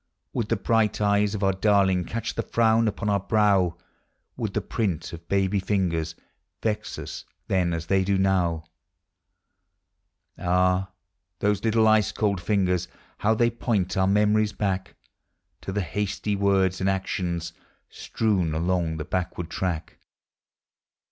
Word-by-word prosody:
279 - - -2
Would 110 - -2
the 110 -4 -1
bright 110 -2 +2
eyes 105 0 +2
of 105 - -3
our 95 0 +3
darling 95 -2 +2
Catch 115 +5 -3
the - - -1
frown 115 0 +2
upon 105 +1 -2
our 100 -1 +2
brow? 100 -4 +2 0.6
Would - - -4
the - - +3
print 90 -9 -2
of 85 0 -10
baby 100 0 +1
fingers 85 -5 -1 0.5
Vex 110 0 -2
us - - -7 0.2
then 90 -2 +1
as 85 -1 -3
they 95 +2 +2
do 100 +1 +1
now? 90 -4 +1 1.8
Ah! 90 +1 +2 0.5
those 105 -1 0
little 110 -1 +3
ice 110 -1 +4
cold 100 -4 0
fingers, 90 -2 +1 0.3
liow 110 +1 +2
they 120 0 +3
point 105 -6 -1
our 95 0 +2
memories 105 +1 +3
back 95 -2 -2 0.7
To - - -5
the 100 +1 -1
hasty 100 +4 -2
words 95 -2 +2
and 95 - +2
actions 90 -3 -2 0.3
Strewn 95 -8 -1
along 85 -1 0
the 75 - -4
backward 90 -2 -3
track! 85 -4 -3
95 Hz, 140 wpm, -25 LUFS, 90-105 Hz, 1.8 s, ice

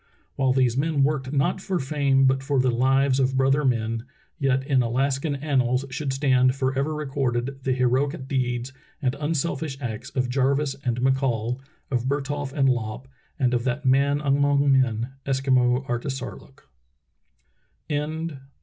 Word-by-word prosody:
While 135 -1 +2
these 125 -2 +2
men 145 +1 +1
worked 135 -2 0
not 145 +6 +1
for 190 -1 -1
fame 135 -2 +2
but 135 0 +3
for 135 0 0
the 130 0 +3
lives 135 +2 +2
of 130 0 +1
brother 135 +3 +3
men, 115 -3 0 0.4
yet 135 -2 +1
in 135 -2 +3
Alaskan 135 +5 0
annals 135 -3 0
should 140 0 -2
stand 130 -2 +3
forever 135 +3 -1
recorded 135 -3 -2
the 130 - 0
heroic 130 +3 0
deeds 125 -1 -2 0.3
and 130 -4 0
unselfish 150 -2 -2
acts 120 -1 -5
of 125 -2 -1
Jarvis 135 +2 +1
and 120 -2 -1
McCall, 130 -2 0 0.3
of 125 -2 0
Bertholf 145 0 -2
and 135 -1 +2
Lopp, 120 0 -2 0.3
and 125 -4 +1
of 120 -1 +1
that 135 +3 -2
man 140 +2 +3
among 140 0 +3
men 120 -3 +2
— 135 - -37
Eskimo 130 -1 +2
Artisarlook. 135 +2 -5
135 Hz, 145 wpm, -24 LUFS, 125-140 Hz, 0.4 s, but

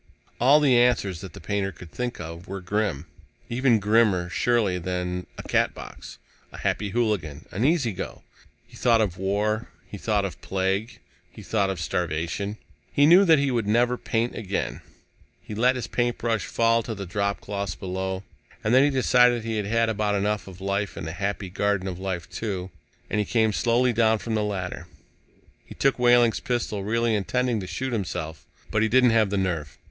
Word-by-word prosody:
All 135 +5 +6
the 135 -5 +4
answers 115 -8 +2
that 95 -4 -9
the - - -10
painter 100 +2 -2
could 85 -1 -13
think 125 +4 -4
of 85 +2 -8
were 95 +1 -5
grim. 95 -4 -1 0.5
Even 125 -1 +3
grimmer, 105 -4 +2
surely, 105 -3 +1
than 90 0 -3
a - - -7
Catbox, - - -2 0.3
a - - -10
Happy 105 0 -1
Hooligan, 95 -10 -1
an 105 - -2
Easy 145 -5 +2
Go. - - -7 0.4
He - - -18
thought 115 -2 +3
of 95 -5 0
war. 105 +3 0 0.2
He 100 +1 -9
thought 105 -2 +1
of 95 - -6
plague. 95 +4 -1 0.3
He - - -12
thought 100 -3 +1
of 95 -3 -3
starvation. 85 +4 -2 0.3
He 145 - +4
knew 180 +6 +7
that 165 -3 +6
he 140 -1 +1
would 115 -4 0
never 120 +3 +3
paint 115 0 -1
again. 95 - -3 0.6
He - - -9
let 125 +4 +3
his 125 - -3
paintbrush 120 -3 -1
fall 115 0 +2
to 110 0 -5
the 100 -1 -6
dropcloths 100 -1 -2
below. 95 0 -4 0.4
And 110 - +1
then 130 +1 +7
he 145 - +4
decided 125 -3 +4
he 115 -1 -2
had 105 -2 -2
had 115 +1 +2
about 105 -2 0
enough 105 +1 -1
of 95 -2 -11
life 100 +1 -2
in - - -5
the 80 - -4
Happy 100 +1 -3
Garden 100 0 0
of 90 -1 -5
Life, 90 -3 -3
too, 95 -4 -4 0.4
and - - -1
he - - +2
came 110 -1 +2
slowly 120 +3 +2
down 110 0 +3
from 115 +1 -4
the 110 - +1
ladder. 90 -4 -4 0.8
He - - -12
took 135 -2 +1
Wehling's 120 -2 +5
pistol, 115 -5 -2
really 115 +2 +1
intending 120 +3 0
to 95 - -6
shoot 125 +8 -3
himself. 85 -7 -4 0.2
But 110 - +2
he 110 - +2
didn't 125 +1 +5
have 110 -3 +3
the 100 - -1
nerve. 85 -6 -2
105 Hz, 185 wpm, -25 LUFS, 95-120 Hz, 0.8 s, knew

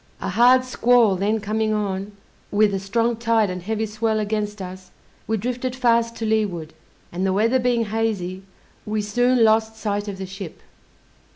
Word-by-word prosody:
A - - -3
hard 245 +6 +5
squall 245 -4 +3
then 205 +4 0
coming 215 +1 -1
on, 200 -1 -3 0.4
with 205 0 +3
a 195 - -1
strong 230 +5 0
tide 225 -3 +2
and 180 0 -5
heavy 220 +4 -2
swell 215 +1 -1
against 210 0 -2
us, 185 0 -8 0.4
we 220 - 0
drifted 250 +3 -3
fast 235 -2 +2
to 225 - -4
leeward, 200 -8 -1 0.4
and 180 +2 -3
the 190 - +2
weather 230 +6 +2
being 240 -2 +1
hazy, 210 -4 -2 0.4
we 215 0 -2
soon 245 +3 +2
lost 220 0 +3
sight 205 -1 -2
of 200 -2 -5
the 190 - -5
ship. 190 -2 -9
215 Hz, 170 wpm, -22 LUFS, 195-230 Hz, 0.4 s, hard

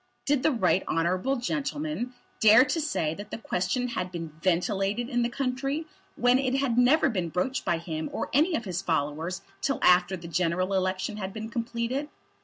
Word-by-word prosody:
Did 285 -2 +2
the 315 - +3
Right 190 - +2
Honourable 180 - +1
gentleman 285 0 -3 0.2
dare 220 +4 +7
to 305 +5 -1
say 165 - -1
that 205 +4 -9
the - - -5
question 225 +4 -1
had 180 -6 -3
been 165 -2 -5
ventilated 195 +5 0
in 245 -3 +1
the 235 - +1
country, 275 +4 -2 0.3
when 245 +1 +4
it 260 -1 0
had 270 -4 +1
never 255 +6 +5
been 185 -9 -1
broached 180 +11 -1
by 170 - +1
him 160 -1 -4
or - - -3
any 320 +6 +3
of 235 - -3
his 185 -1 -2
followers 160 0 -2 0.2
till 275 - 0
after 180 +1 +5
the 170 -1 -9
general 180 +2 0
election 185 +2 -1
had 190 -2 -5
been 220 0 -6
completed? 235 +5 -2
220 Hz, 185 wpm, -27 LUFS, 180-260 Hz, 0.3 s, dare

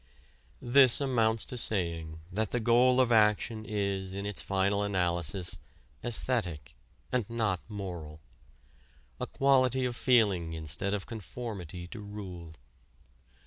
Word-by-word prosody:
This 130 0 +6
amounts 115 -5 +2
to 125 - -4
saying 85 -7 -2
that 110 +4 -1
the 125 - -1
goal 125 +2 +4
of 125 -2 +3
action 110 0 +3
is 100 -3 -2
in 100 0 -4
its 105 -2 -2
final 100 +1 +1
analysis 90 -2 0 0.4
æsthetic 110 - -1 0.4
and 120 -4 0
not 110 -6 0
moral 90 -7 -6 1.0
a - - -3
quality 130 -2 +3
of 125 -1 -2
feeling 100 -10 +2
instead 80 +5 -2
of 100 - -5
conformity 100 -6 -7
to 110 - -8
rule. 95 -6 -8
105 Hz, 120 wpm, -30 LUFS, 90-120 Hz, 1.0 s, This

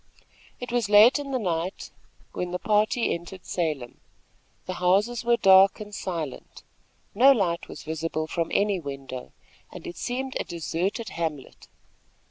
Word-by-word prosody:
It 245 -1 -6
was 240 -4 0
late 215 +7 +7
in 285 -1 -6
the 265 - 0
night 180 -4 -3 0.4
when 180 - -4
the 180 - -2
party 215 +4 +1
entered 175 +2 -8
Salem. 150 -8 -3 0.7
The 185 - -4
houses 205 +7 +2
were 235 0 +3
dark 190 -1 +6
and 210 -1 -9
silent. 165 -8 -6 0.5
No 255 +7 +7
light 180 -9 0
was - - -10
visible 160 0 -3
from 165 +1 -2
any 200 -2 +1
window, 135 -4 -7 0.4
and - - -10
it 175 - -7
seemed 260 +2 -3
a - - -1
deserted 180 +7 -3
hamlet. 160 -5 -5
185 Hz, 145 wpm, -26 LUFS, 165-220 Hz, 0.7 s, late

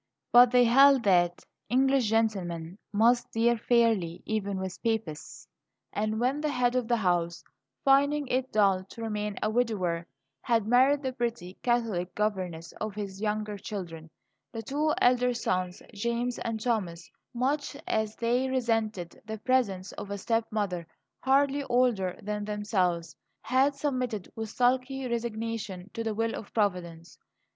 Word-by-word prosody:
But 245 0 +8
they 250 0 +5
held 270 +2 +6
that 175 -3 +2 0.2
English 265 -2 +3
gentlemen 190 -6 -1
must 235 +4 +3
deal 235 +1 +3
fairly, 225 -7 +1
even 200 -3 -2
with 190 -1 -5
Papists; 220 -10 -3 0.5
and 215 +1 -1
when 260 +5 +1
the 305 - 0
head 250 -2 +1
of 250 -3 0
the 235 0 +2
house, 175 -4 0 0.4
finding 285 +2 +4
it 260 0 -1
dull 195 -3 +3
to 200 +4 -12
remain 210 -2 -3
a 215 - +1
widower, 190 -8 0 0.3
had 230 -3 +1
married 260 +5 +4
the 260 -1 -2
pretty 235 -7 -3
Catholic 225 -8 0
governess 185 -6 -2
of 215 -2 -3
his 200 -2 -6
younger 210 -1 -2
children, 170 -6 -7 0.4
the 225 -2 -6
two 295 +6 0
elder 250 0 +3
sons, 185 -5 -2
James 235 +3 -2
and 225 -1 -3
Thomas, 200 -8 -2 0.2
much 280 +4 -1
as 220 0 -1
they 245 +3 0
resented 225 -8 -1
the 220 0 -4
presence 210 -6 0
of 200 - -8
a 200 - -3
step 225 +3 0
mother 185 -6 -2 0.3
hardly 275 +1 +2
older 240 -8 +1
than 210 0 -3
themselves, 185 -5 -1 0.3
had 265 +3 +2
submitted 255 -8 -2
with 225 -1 -4
sulky 255 +2 +1
resignation 225 -5 -4
to 230 - -3
the 220 -2 -2
will 225 +1 0
of 210 - -7
Providence. 180 -6 -2
225 Hz, 145 wpm, -28 LUFS, 195-245 Hz, 0.5 s, But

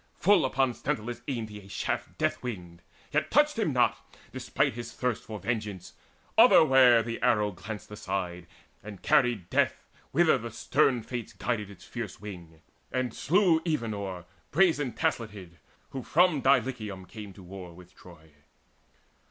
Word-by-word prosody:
Full 195 -6 +4
upon 130 -1 +1
Sthenelus 115 +1 -3
Aimed 115 -5 -3
he 105 0 -9
a 95 - -15
shaft 100 - -3
death - - 0
winged, 90 -8 -7 0.3
yet - - 0
touched - - +3
him - - +1
not, - - +2 0.3
Despite - - 0
his 120 +1 -7
thirst 125 -3 -1
for 110 0 -6
vengeance: 105 -5 -4 0.5
otherwhere 125 -3 +7
The 115 +1 -5
arrow 105 -1 +2
glanced 105 +3 -8
aside, 90 -4 -4 0.3
and 100 -2 -10
carried 120 - +2
death - - +1 0.2
Whither - - +4
the - - -6
stern 125 -4 +1
Fates 120 -1 -6
guided 105 -5 -2
its 100 -3 -13
fierce 115 -6 -6
wing, 85 -6 -10 0.3
And 130 -2 -1
slew 175 -2 +3
Evenor 105 - -3 0.2
brazen 150 - +2
tasleted, 105 - -3 0.3
Who 135 - -4
from 170 0 +3
Dulichium 120 -8 +1
came 105 +1 -9
to 95 - -14
war 90 -1 -9
with 90 0 -15
Troy. 80 -3 -16
110 Hz, 145 wpm, -28 LUFS, 95-125 Hz, 0.5 s, otherwhere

